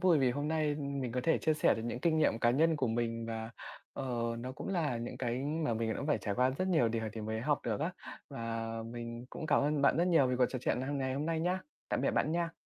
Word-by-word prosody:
vui 180 -5 +5
vì 130 -2 +3
hôm 145 +4 -2
nay 155 -2 +1
mình 140 -4 -3
có 125 - 0
thể 165 - +3
chia 155 - +2
sẻ 155 - +4
được 115 - -4
những 120 +1 -3
kinh 160 0 +2
nghiệm 145 -7 +3
cá 120 0 +4
nhân 160 +5 +3
của 135 -3 +1
mình 115 0 -1
và, 115 0 -4 0.4
ờ, 135 - -4 0.3
nó 125 +2 -5
cũng - - -7
là 160 -10 0
những 120 +1 -5
cái 120 -1 -1 0.3
mà 115 - +1
mình 110 0 -1
đã - - -4
phải 150 - +2
trải 100 -2 -2
qua 125 +1 +3
rất 185 +8 -1
nhiều 155 -10 +4
điều 110 -1 -1
thì 115 - -5
mới 110 +1 -2
học 145 +2 +1
được 110 -3 -1
á. 165 +5 0 0.4
Và 115 -3 -3 0.2
mình 120 0 -6
cũng 155 - -5
cảm 145 - +4
ơn 145 0 +1
bạn 140 - +5
rất 175 +2 +3
nhiều 160 -6 +5
về 125 0 0
cuộc 125 0 +4
trò 130 - -3
chuyện - - +1
hằng 140 +2 -2
ngày 130 -1 -1
hôm 145 +3 -2
nay 165 -1 0
nhá. 180 +2 +1 0.3
Tạm - - 0
biệt - - +2
bạn 155 - +1
nha. 170 -1 0
130 Hz, 280 wpm, -33 LUFS, 115-155 Hz, 0.4 s, vui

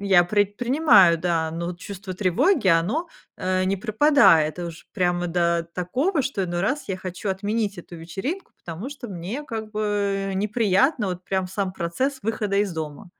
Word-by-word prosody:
я 190 -3 +5
предпринимаю, 205 - +4
да, 165 -2 0
но 170 +1 -4
вот 175 0 -5
чувство 190 0 -7
тревоги, 195 - +2
оно, 295 - -2 0.3
э, 185 0 0
не 195 +1 0
пропадает 200 - +4
уж 170 -2 -7
прямо 175 -2 0
до 170 -1 +1
такого, 270 - 0
что 250 -7 -2
иной 175 -1 -2
раз 265 +8 -1
я 190 - -2
хочу 185 +2 -6
отменить 205 0 -2
эту 175 0 -10
вечеринку, 195 - -5
потому 175 +8 -6
что 265 -5 -8
мне, 195 - -5
как 220 -5 -5
бы, 200 -2 -1
неприятно 210 - +2
вот 180 0 -5
прям 190 -1 -1
сам 190 0 -2
процесс 225 +11 -2
выхода 210 -2 -1
из 200 -2 +1
дома. 160 +4 -6
195 Hz, 165 wpm, -24 LUFS, 175-220 Hz, 0.3 s, я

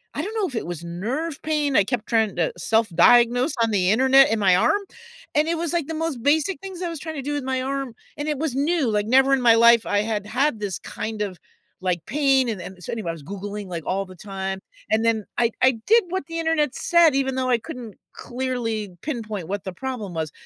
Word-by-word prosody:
I - - -1
don't 430 +3 -5
know 425 -4 0
if 275 - -9
it 225 - -3
was 170 -2 -6
nerve 245 - -4
pain- 300 -3 0
I 205 - +6
kept 230 +1 -3
trying 220 -3 +1
to 170 -2 0
self-diagnose 230 - +3
on 225 - +1
the 185 -3 +2
internet- 265 +5 +5
in 225 - +2
my 190 -3 +4
arm, 295 - +3 0.5
and 300 +1 +2
it 335 - +1
was, 335 -1 -2
like, 335 -5 0
the 320 - -4
most 315 -6 -3
basic 305 +7 +1
things 380 -2 -7
I 350 - -2
was 330 -3 -6
trying 315 +2 -6
to 275 - -5
do 290 +2 -3
with 290 -2 -2
my 260 0 -1
arm, 270 -2 -3 0.2
and 290 +1 -4
it 300 - -1
was 295 -3 -2
new, 295 +1 +1
like, 210 -1 0
never 265 +3 +4
in 270 - +2
my 235 -2 +6
life 235 0 +6
I 205 - +2
had 210 -1 -3
had 270 +1 0
this, 200 -4 -3
kind 215 -1 -5
of, 185 -4 -6 0.4
like, 175 -3 -1
pain 270 -1 +2
and 215 -5 -3
and 180 +1 -10
so - - -5
anyway, 220 -7 -4
I - - -1
was 160 -3 -11
Googling, 200 +4 -6
like, 170 -3 -5
all 195 +1 -1
the 185 -1 -13
time, 190 +1 -5 0.3
and 220 +1 +2
then 225 -2 +1
I 235 -1 +3
I 260 - +7 0.2
did 460 +1 +5
what 370 -5 -3
the 330 - -5
internet 320 -4 0
said, 340 -4 +4
even 270 -1 0
though 260 -1 -1
I 245 - +4
couldn't 235 -4 -9 0.2
clearly 240 -5 -3
pinpoint 220 - -4
what 200 +1 -4
the 190 - -6
problem 230 -3 -5
was, 160 -2 -3
240 Hz, 240 wpm, -23 LUFS, 205-290 Hz, 0.5 s, I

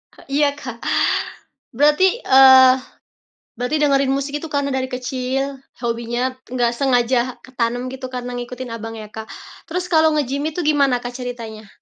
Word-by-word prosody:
E - - -16 0.2
iya, 290 - +5
Kak. 245 -5 -8 0.9
Berarti 300 - +3
eee, 260 -1 +8 0.9
berarti 250 +5 -1
dengerin 275 -2 +3
musik 280 +2 -2
itu 325 - -7
karena 285 -2 -1
dari 260 0 -1
kecil, 260 +2 -3 0.2
hobinya 235 +1 -2 0.2
nggak 245 -1 0
sengaja 245 -1 +2 0.2
ketanam 245 0 -2
gitu 260 0 -6
karena 250 -1 -6
ngikutin 245 0 -6
abang, 225 0 -7
ya, 215 -1 -9
Kak. 220 0 -8 0.4
Terus 360 +2 -3
kalau 315 0 +5
nge-gym 280 -1 -1
itu 315 +2 -5
gimana 280 -4 +3
Kak, 245 0 -5
ceritanya? 230 -4 -7
255 Hz, 145 wpm, -20 LUFS, 245-280 Hz, 0.9 s, eee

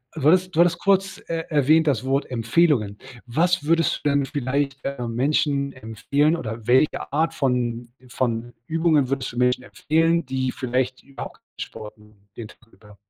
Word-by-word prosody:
Würdest - - -14
du 150 0 +3
hattest 185 0 +2
du - - 0
hattest 175 0 +4
kurz, 195 -1 +1
äh, 165 -1 -2
erwähnt 155 +2 +3
das 130 -5 +1
Wort 135 +1 0
Empfehlungen. 115 -3 +1 0.3
Was 165 +7 +1
würdest 165 0 +1
du 145 - +2
denn 140 -1 +2
vielleicht, 140 0 -2
äh, 130 -3 -4
Menschen 140 +3 0
empfehlen 130 - 0
oder 110 -5 -6
welche 130 +4 +2
Art 160 +3 +1
von 120 -3 -1 0.2
von 120 -1 -2
Übungen 160 -4 +2
würdest 135 -2 -2
du 120 - -11
Menschen 125 0 +2
empfehlen, 165 +5 +1
die 130 -1 -2
vielleicht 130 0 -2
überhaupt 140 0 -9
kein - - -30
Sport 105 0 -8
machen 105 -1 -22
den 110 -2 -8
Tag 120 - -19
über? 105 -1 -18
135 Hz, 175 wpm, -23 LUFS, 120-155 Hz, 0.3 s, hattest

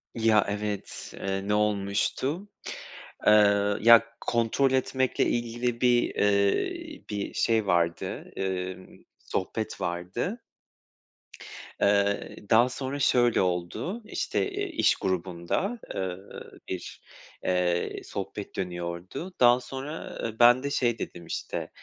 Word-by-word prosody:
Ya 110 -2 +4
evet, 105 0 -4
ııı, 95 0 -2
ne 105 - +1
olmuştu? 105 - 0 0.8
Iıı, 100 -1 +5
ya 115 0 +9 0.2
kontrol 120 +3 +1
etmekle 130 0 +1
ilgili 120 +1 -1
bir, 120 -1 +3
ııı, 290 - +1
bir 105 -1 -3
şey 110 -3 +1
vardı, 85 -2 0
ııı, 95 -1 -3 0.3
sohbet - - -3
vardı. 90 - -3 1.4
Iıı, 100 0 +2
daha 120 +2 +6
sonra 135 +2 -4
şöyle 120 -3 +4
oldu, 95 - -2
işte, 400 - -1
eee, 405 +1 -2
iş 325 - +3
grubunda, 95 - -2 0.2
ııı, 95 0 -6 0.2
bir, 90 -2 -6 0.4
eee, 90 -1 0
sohbet 100 +1 -6
dönüyordu. 90 - -5
Daha 120 0 +6
sonra 135 +5 -7 0.2
ben 120 +2 +7
de 140 - -1
şey 120 -5 +1
dedim, 85 -1 -6
işte, - - -4
105 Hz, 105 wpm, -27 LUFS, 95-125 Hz, 1.4 s, ya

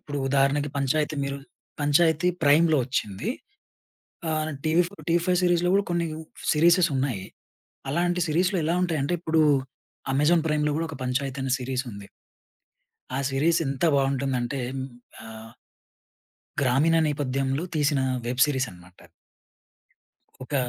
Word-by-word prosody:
ఇప్పుడు 145 -1 -5
ఉదాహరణకి 140 +1 +2
పంచాయతి 150 +3 0
మీరు 140 0 -4 0.4
పంచాయతీ 160 +3 +3 0.2
ప్రైమ్‌లో 155 +1 +5
వచ్చింది. 105 -6 -3 1.0
ఆహ్, 155 0 -1 0.2
టీవీ 160 +3 +3
ఫో 200 - -16
టీవీ 170 +1 +3
ఫైవ్ 180 -1 +2
సీరీస్‌లో 175 0 +2
గూడా 200 - +3
కొన్ని 170 -1 0 0.5
సీరీసెస్ 170 +3 +4
ఉన్నాయి. 125 -8 -2 0.7
అలాంటి 175 +3 0
సీరీస్‌లో 180 +5 +1
ఎలా 165 +2 +1
ఉంటాయంటే 165 -2 0
ఇప్పుడు 160 -1 +1 0.7
అమెజాన్ 155 +4 +3
ప్రైమ్‌లో 150 -1 +1
గూడా 165 - -2
ఒక 160 - -7
పంచాయత్ 130 +2 -2
అనే 135 -1 -2
సీరీస్ 130 0 -2
ఉంది. 100 -1 -10 1.1
ఆ - - 0
సిరీస్ 150 +5 +2
ఎంత 135 -1 -3
బావుంటుందంటే 135 -1 0 0.2
హ్మ్. 130 0 -3 0.4
ఆహ్ 110 0 -10 1.1
గ్రామీణ 140 +5 +3
నేపథ్యంలో 135 0 -1
తీసిన 145 -2 +1 0.3
వెబ్ 125 +2 -2
సీరీస్ 135 -3 0
అనమాట. 90 0 -17 1.4
ఒక, 130 - -7
145 Hz, 125 wpm, -25 LUFS, 135-165 Hz, 1.4 s, ప్రైమ్‌లో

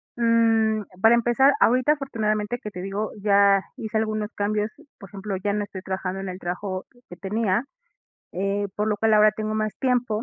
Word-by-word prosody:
mm, 225 -2 +3 0.2
para 225 +2 +6
empezar, 240 +4 +4
ahorita, 255 +4 +4
afortunadamente 220 -5 -2
que 210 -6 -7
te 180 - -7
digo, 200 +3 -3
ya 200 -1 +4
hice 220 0 -3
algunos 215 -1 -2
cambios, 210 +1 -1 0.3
por 195 - -12
ejemplo, 200 +1 -5
ya 200 +2 -1
no 210 - -1
estoy 200 -2 -8
trabajando 190 0 -3
en 195 - -5
el 185 0 -7
trabajo 185 +1 -4 0.2
que 175 - -9
tenía, 205 +4 -1 0.7
eh, 200 +2 -1
por 210 +1 -1
lo 210 - 0
cual 220 +1 +2
ahora 215 0 +6
tengo 215 0 -4
más 215 -1 -2
tiempo. 245 -4 0
210 Hz, 180 wpm, -24 LUFS, 195-225 Hz, 0.7 s, para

